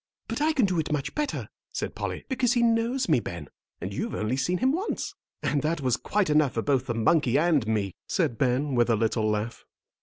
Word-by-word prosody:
"But - - -3
I 310 +1 +4
can 265 -8 +3
do 185 -3 0
it 155 - -2
much 150 -3 -1
better," 300 -2 -2 0.2
said - - -4
Polly, - - -4
"because 260 -2 +1
he 240 -2 +2
knows 235 +3 +2
me, 155 -7 +4
Ben, 85 -9 -7 0.3
and - - -5
you've - - -3
only 110 +4 -1
seen 175 +8 0
him 260 +5 +2
once." 370 +8 -2 0.3
"And 145 - +1
that 155 +1 0
was 125 -3 +2
quite 205 +7 0
enough 150 -3 +3
for 115 - 0
both 135 -3 +1
the 120 - -1
monkey 130 +2 +3
and 150 -7 +3
me," 105 -4 0
said 115 - 0
Ben, 135 +2 +1
with 120 -1 +3
a 115 - +4
little 110 0 +1
laugh. 105 +2 -2
145 Hz, 220 wpm, -27 LUFS, -, 0.3 s, I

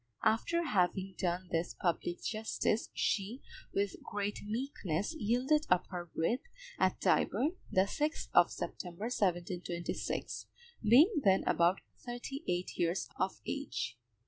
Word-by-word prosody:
After 230 +10 +2
having 190 - +1
done 180 0 -1
this 165 +1 -1
public 175 0 -1
justice, 220 0 0
she, 215 +5 -1 0.3
with 200 -1 -1
great 205 0 -3
meekness, 210 - -2
yielded 265 +3 +2
up 180 0 +4
her 175 -1 -4
breath 170 +8 0 0.4
at - - +2
Tyburn, 315 +8 +2
the 185 - +5
6th 300 +10 -1
of - - +7
September, 175 +2 -5
1726, 175 -3 -2 0.3
being 290 - +6
then 190 -2 +5
about 175 +3 +3 0.2
thirty 250 +4 -5
eight 180 +1 -2
years 170 +2 +1
of - - -1
age. - - -3
200 Hz, 120 wpm, -33 LUFS, 175-245 Hz, 0.4 s, of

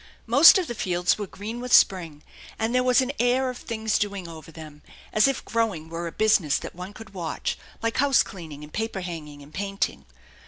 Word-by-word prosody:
Most 275 +11 +8
of 370 - 0
the 240 - -5
fields 180 -3 0
were 205 - -4
green 220 +6 -7
with 250 0 -6
spring, 165 -6 +3 0.3
and 225 +2 -1
there 250 - +3
was 250 +1 +4
an 260 +1 -1
air 255 +2 +2
of 250 - -10
things 220 -2 -1
doing 200 -3 -3
over 165 -1 -11
them, 155 -2 -11 0.3
as 215 +4 +5
if 275 - -2
growing 210 -9 -1
were 170 +1 -4
a - - -5
business 210 -9 +2
that - - -7
one 180 +3 -8
could 215 -1 -12
watch, 170 -4 -3 0.3
like 230 0 -1
house 275 -1 +4
cleaning 155 -6 -10
and 150 - -12
paper 220 -3 -3
hanging 150 -5 -7
and 145 +2 -17
painting. 195 +2 -3
200 Hz, 205 wpm, -25 LUFS, 165-230 Hz, 0.3 s, Most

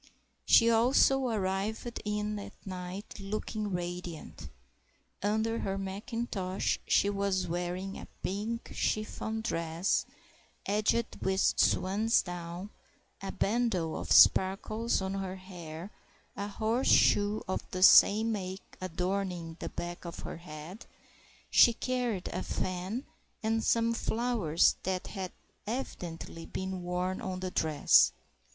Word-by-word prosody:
She 230 - +7
also 255 +3 +4
arrived 215 +2 -2
in 210 0 -2
at 200 - -8
night 185 +2 -7
looking 210 +1 -3
radiant. 175 -2 -5 0.7
Under 220 +3 0
her 195 0 -2
mackintosh 195 -1 -2
she - - +4
was 195 -2 0
wearing 180 +3 -3
a - - -9 0.2
pink 215 +4 -3
chiffon 220 +1 -2
dress, 165 -3 0 0.6
edged 215 +3 +1
with 190 0 +1 0.2
swansdown; 185 -2 +1 0.5
a 195 - -4
bandeau 205 -7 0
of - - -5
sparkles 215 +5 +5
was - - +3
on 190 0 -2
her 190 -1 -4
hair, 180 -1 -9 0.4
a 200 - -3
horseshoe 215 -1 +3
of 185 - -1
the 185 0 -1
same 220 +3 +7
make 190 -2 -6
adorning 180 -1 -2
the - - -4
back 175 0 -6
of 170 -1 -7
her - - -6
head; 165 +4 -10 0.6
she 235 - +7
carried 245 -6 -2
a - - -3
fan, 185 +8 -3 0.4
and 225 +1 +1
some 230 0 +2
flowers 225 -8 +2
that 185 0 -2
had 190 -3 -5 0.4
evidently 170 -8 -5
been 190 -1 -4
worn 180 +1 -2
on 185 -1 -4
the 185 0 -4
dress. 155 -4 +4
195 Hz, 120 wpm, -31 LUFS, 180-220 Hz, 0.7 s, She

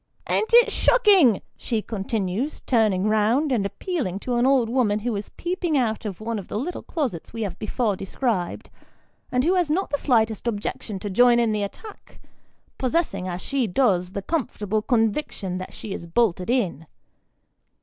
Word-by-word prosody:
" - - -35
An't 435 - 0
it 475 0 +6
shocking? 390 - +4
" - - -48
she 225 -4 -2
continues, 215 +4 -3
turning 215 -6 +2
round, 220 +8 +2
and 210 -6 +1
appealing 265 - -3
to 250 - -3
an 240 +2 +3
old 265 -4 +4
woman 230 -4 +1
who 235 0 -1
is 200 0 -5
peeping 350 -3 -1
out 225 -3 0
of 195 -4 -5
one 225 0 -3
of 195 - -9
the - - -4
little 315 +11 -3
closets 255 - -4
we 225 -1 -3
have 190 -3 -5
before 215 -1 -1
described, 195 -1 -3 0.6
and 250 0 +2
who 345 +5 +3
has 355 -4 +1
not 355 +3 0
the 285 - 0
slightest 225 -4 +1
objection 210 -1 -3
to 200 +1 -5
join 240 +4 +5
in 230 -2 +2
the 210 -1 -1
attack, 400 - -8 0.6
possessing, 255 - 0
as 180 0 -4
she 270 -4 0
does, 185 -4 +1
the 200 - -4
comfortable 215 - -1
conviction 220 -5 -1
that 185 - -7
she 210 - -7
is 170 - -7
bolted 185 -1 +1
in. 185 - 0
225 Hz, 180 wpm, -24 LUFS, 200-270 Hz, 0.6 s, it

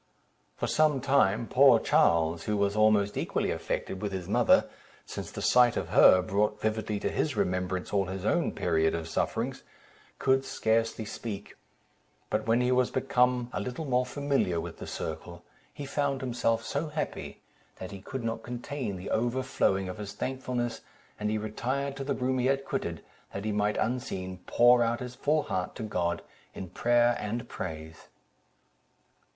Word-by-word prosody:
For - - -1
some 155 -3 +3
time, 125 -5 +2
poor 130 -2 +6
Charles, 80 -3 +2
who 105 -1 0
was 100 0 +1
almost 110 -1 +3
equally - - -1
affected 95 - -3
with 105 -1 -2
his 95 -2 -5
mother - - +4 0.4
(since - - -6
the - - -6
sight 125 -1 +5
of - - -3
her 90 0 +7
brought 105 +3 0
vividly 110 -1 -1
to - - -1
his 150 -5 -1
remembrance 90 0 -1
all 100 -1 +2
his 95 +1 -5
own 170 +9 +2
period 80 -2 +1
of 85 -1 -4
sufferings), - - -2 0.6
could 135 0 +2
scarcely 115 -2 0
speak; 105 -1 -6 0.8
but - - -1
when 115 +2 +3
he 125 0 +2
was 125 -1 +3
become 125 -2 +1
a - - -2
little 125 +6 -4
more 125 -2 +2
familiar 140 -11 0
with - - -7
the - - -7
circle, - - -6 0.3
he 145 - -7
found 140 -1 -1
himself 115 -3 0
so 145 +3 -2
happy, 150 0 -5 0.4
that 95 +1 -8
he 100 -1 -8
could 130 +4 -6
not 115 0 -2
contain 125 -2 -4
the 90 +1 -6
overflowing 120 -5 +1
of 90 +3 -6
his 100 -1 -6
thankfulness; 125 -3 -3 0.4
and 105 0 -1
he 110 - 0
retired 130 +6 -2
to 135 - -5
the 140 0 -1
room 130 0 0
he 125 - +2
had 135 0 +1
quitted, - - -3 0.3
that 100 +1 -5
he 110 - 0
might, 105 0 0
unseen, 95 -7 -2
pour 120 0 +5
out 120 0 +1
his 125 -1 -6
full 150 +4 +1
heart 90 -1 -3
to - - -5
God, 90 -5 -1 0.3
in 95 - -6
prayer 120 +3 +3
and 115 +4 -4
praise. 80 -2 -7
115 Hz, 170 wpm, -29 LUFS, 100-130 Hz, 0.8 s, her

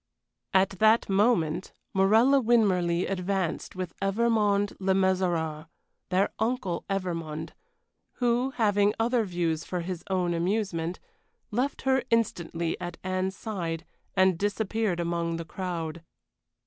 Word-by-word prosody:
At 190 0 +4
that 220 0 +4
moment 195 -5 +2 0.2
Morella 220 +8 +5
Winmarleigh 185 -7 +2
advanced 190 -2 -2
with 185 -2 -4
Evermond 205 -1 +2
Le 190 0 +2
Mesurier 175 -5 0 0.4
their 190 +1 +2
uncle 220 -6 -1
Evermond 165 -5 -3 0.6
who, 245 +1 +1
having 205 -3 +3
other 235 +1 +2
views 170 -4 -1
for 180 -1 -3
his 175 0 -5
own 180 -2 +1
amusement, 175 -1 -1 0.5
left 250 +6 -1
her 265 0 +3
instantly 170 -7 0
at 175 -1 -5
Anne's 185 +1 -1
side 175 -7 -4 0.3
and 190 -3 +4
disappeared 205 -2 0
among 170 -1 -1
the 165 0 -5
crowd. 170 -2 -4
190 Hz, 115 wpm, -28 LUFS, 170-215 Hz, 0.6 s, Morella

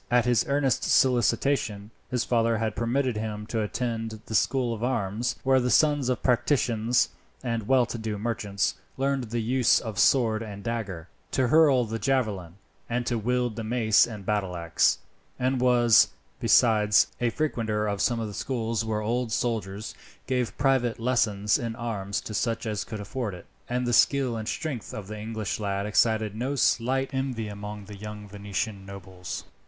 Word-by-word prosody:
At 120 -1 +3
his 120 -2 +3
earnest 140 -3 +1
solicitation, 120 -4 +2 0.2
his 125 -2 0
father 115 -1 +2
had 110 -2 -2
permitted 125 0 0
him 105 -1 -4
to 110 0 -2
attend 115 0 -3
the - - -7
School 125 +2 +1
of 115 0 -6
Arms, 115 -2 -1
where 130 0 +4
the 125 0 0
sons 145 -2 +3
of 125 - -1
patricians 120 -2 +2 0.3
and 115 -4 -2
well 130 -1 +4
to 115 - -6
do 110 -1 -3
merchants 105 -2 -1 0.2
learned 135 -1 0
the 115 0 -3
use 125 +1 +3
of 110 -4 -5
sword 115 -5 +3
and 100 -3 -7
dagger, 100 -8 -4 0.3
to 130 -2 +2
hurl 140 -4 +5
the 115 +1 -4
javelin, 105 -8 -1 0.3
and 120 0 -1
wield 120 0 0
the 115 - -4
mace 110 -1 +3
and 105 -4 -8
battleaxe; 90 -5 +1 0.4
and 130 0 0
was, 120 -2 +5 0.3
besides, 105 -3 +4 0.2
a 120 - +2
frequenter 115 -6 -1
of 100 -2 -2
some 120 -2 +1
of 110 - -2
the 105 - -7
schools 115 -2 -2
where 110 -1 -2
old 115 +2 -1
soldiers 110 -2 -2 0.3
gave 125 -3 -1
private 130 -4 +1
lessons 110 -3 +1
in 115 -3 -4
arms 105 -4 -3
to 110 - -7
such 115 +2 -1
as 105 -2 -2
could 110 - -7
afford 105 -1 -4
it; 90 - -12 0.2
and 125 +1 -1
the 120 - 0
skill 130 0 +3
and 110 -1 -5
strength 145 -8 -4
of 105 - -6
the 105 +1 -7
English 110 -1 -4
lad 100 -1 -2
excited 110 0 +2
no 130 +5 -2
slight 130 +1 +1
envy 130 -4 -2
among 105 0 -7
the 105 +1 -10
young 105 +1 -8
Venetian 100 0 -4
nobles. 95 -2 -8
115 Hz, 170 wpm, -26 LUFS, 105-125 Hz, 0.4 s, hurl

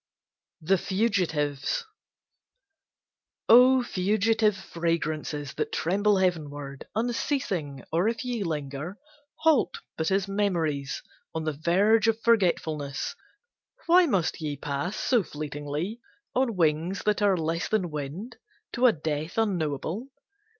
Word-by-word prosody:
THE 185 +4 +2
FUGITIVES 180 -10 0 1.6
O 250 +2 +7
fugitive 210 +1 +2
fragrances 155 -5 -2
That - - -2
tremble 200 +4 +2
heavenward 145 -7 -2
Unceasing, 215 - -1
or 170 +5 +2
if 230 +2 -2
ye 245 -3 -2
linger, 150 +2 -4 0.4
Halt 315 -5 +2 0.2
but 160 0 0
as 195 0 +1
memories 170 -9 -1 0.3
On 160 - -1
the 155 -1 -1
verge 200 +9 +3
of 225 0 +2
forgetfulness, 170 - +1 0.7
Why 355 +1 +6
must 185 - 0
ye 150 -2 -3
pass 145 +7 -3
so 245 0 +2
fleetly 150 +6 -5 0.3
On 250 -3 +1
wings 165 +2 +1
that 210 0 +1
are 200 -2 +4
less 165 +1 -1
than 190 -6 0
wind, 155 - -6 0.3
To 250 +1 +4
a - - +7
death 155 +2 -3
unknowable? 180 - -1
180 Hz, 115 wpm, -27 LUFS, 150-215 Hz, 1.6 s, O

